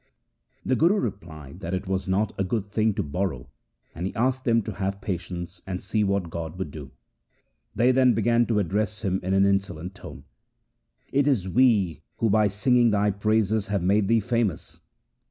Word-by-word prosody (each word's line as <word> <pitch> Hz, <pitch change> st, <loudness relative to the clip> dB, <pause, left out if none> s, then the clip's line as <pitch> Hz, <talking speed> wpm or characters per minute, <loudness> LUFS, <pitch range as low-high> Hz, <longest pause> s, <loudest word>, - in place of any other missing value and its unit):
The 130 Hz, -, +2 dB
Guru 170 Hz, +9 st, +4 dB
replied 85 Hz, -, -6 dB
that 95 Hz, -1 st, -3 dB
it 95 Hz, -, -4 dB
was 95 Hz, 0 st, -2 dB
not 100 Hz, +3 st, 0 dB
a 95 Hz, -, -1 dB
good 100 Hz, +2 st, -2 dB
thing 105 Hz, +1 st, 0 dB
to -, -, -1 dB
borrow, 75 Hz, -4 st, -3 dB, 0.4 s
and 85 Hz, +3 st, -3 dB
he -, -, -7 dB
asked 130 Hz, +3 st, 0 dB
them 115 Hz, -3 st, +3 dB
to 110 Hz, -, -5 dB
have 100 Hz, 0 st, -3 dB
patience 90 Hz, -2 st, -5 dB
and 90 Hz, -1 st, -3 dB
see 105 Hz, +3 st, -1 dB
what 100 Hz, -4 st, -1 dB
God 85 Hz, 0 st, -5 dB
would 90 Hz, -6 st, -4 dB
do. 70 Hz, -3 st, -9 dB, 0.9 s
They 120 Hz, +5 st, +4 dB
then 130 Hz, -2 st, +4 dB
began 115 Hz, +2 st, +2 dB
to 115 Hz, -, +1 dB
address 105 Hz, +3 st, -1 dB
him 95 Hz, -2 st, 0 dB
in 95 Hz, +1 st, 0 dB
an 95 Hz, 0 st, +4 dB
insolent 95 Hz, -3 st, -1 dB
tone: 100 Hz, -, -11 dB, 0.5 s
' -, -, -52 dB, 0.3 s
It 140 Hz, +1 st, +2 dB
is 115 Hz, -10 st, +1 dB
we 105 Hz, -, +2 dB, 0.2 s
who 115 Hz, -3 st, +1 dB
by 105 Hz, 0 st, +4 dB
singing 120 Hz, +4 st, +3 dB
thy 105 Hz, -1 st, +2 dB
praises 110 Hz, +1 st, +1 dB
have 100 Hz, -3 st, -1 dB
made 100 Hz, +2 st, +2 dB
thee 115 Hz, +1 st, +3 dB
famous. 115 Hz, -5 st, -2 dB
100 Hz, 190 wpm, -25 LUFS, 90-110 Hz, 0.9 s, Guru